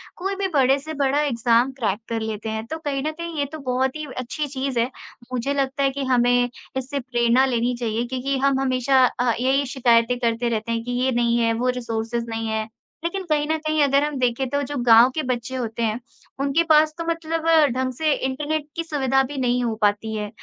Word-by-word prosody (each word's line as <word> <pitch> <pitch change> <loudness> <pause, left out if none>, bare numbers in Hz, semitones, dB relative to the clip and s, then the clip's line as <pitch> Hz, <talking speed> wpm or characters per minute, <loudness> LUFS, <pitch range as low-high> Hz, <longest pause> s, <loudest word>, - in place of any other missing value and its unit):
कोई 390 +2 -3
भी 390 0 -1
बड़े 270 -1 +4
से 315 +3 -7
बड़ा 280 +2 +2
एग्ज़ाम 240 -2 +2
क्रैक 210 -2 0
कर 230 -1 -1
लेते 220 0 -4
हैं, 220 0 -4
तो 320 - -4
कहीं 285 -4 -3
न 310 - 0
कहीं 335 0 -7
ये 285 - +1
तो 315 - -7
बहुत 260 0 -1
ही 305 0 -5
अच्छी 255 +4 -3
चीज़ 265 -2 -2
है। 235 - +1 0.4
मुझे 255 +3 -1
लगता 275 0 -1
है 275 - +4
कि 275 +1 -4
हमें 245 -1 +3 0.3
इससे 265 +2 -3
प्रेरणा 240 0 +2
लेनी 245 -1 0
चाहिए, 230 0 -1
क्योंकि 260 +2 -2
हम 275 0 +2
हमेशा 260 0 +3
अ, 245 -1 0
यही 265 +3 +2
शिकायतें 245 -2 +2
करते 235 0 0
रहते 225 0 -2
हैं 230 0 -1
कि 245 - -5
ये 260 - +2
नहीं 235 -1 +2
है, 230 -1 +2
वो 245 +3 0
रिसोर्सेस 230 0 -3
नहीं 225 0 -3
है, 220 0 -2 0.4
लेकिन 375 +3 -2
कहीं 295 -1 +1
न 315 +1 +1
कहीं 310 -1 0
अगर 280 0 +3
हम 295 -2 -2
देखें 250 +1 0
तो 285 - 0
ओ - - -1
जो 290 +1 -5
गाँव 235 +1 +7
के 310 - -1
बच्चे 255 0 -3
होते 235 -2 -3
हैं, 225 +1 0 0.4
उनके 280 +4 +2
पास 310 0 +5
तो 335 - -3
मतलब 330 -1 -2 0.3
ढंग 260 0 -1
से 310 +3 0
इंटरनेट 295 +3 -2
की 335 - -2
सुविधा 270 -4 +1
भी 280 +2 -6
नहीं 250 -1 +1
हो 230 -2 -1
पाती 210 +2 +1
है। 210 -1 -3
260 Hz, 225 wpm, -23 LUFS, 235-285 Hz, 0.4 s, गाँव